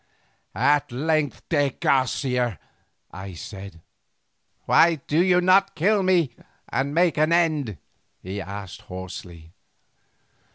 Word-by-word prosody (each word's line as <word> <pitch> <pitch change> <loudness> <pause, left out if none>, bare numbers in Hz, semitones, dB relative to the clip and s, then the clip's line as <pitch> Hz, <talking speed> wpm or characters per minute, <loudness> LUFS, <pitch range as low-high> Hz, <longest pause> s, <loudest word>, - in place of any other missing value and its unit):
"At 140 +3 +2
length, 150 +3 -1
de 145 -3 +2
Garcia!" 125 - 0 0.5
I 95 -1 -8
said. 95 0 -9 0.8
"Why 170 0 +5
do 155 +3 0
you 180 -1 +4
not 195 +2 +4
kill 200 +5 +2
me 175 -9 +2 0.4
and 140 +2 -1
make 170 -2 +3
an 155 +2 +3
end?" 155 - +1 0.4
he 95 +2 -6
asked 100 0 -8
hoarsely. 90 -3 -9
140 Hz, 110 wpm, -24 LUFS, 100-165 Hz, 0.8 s, Why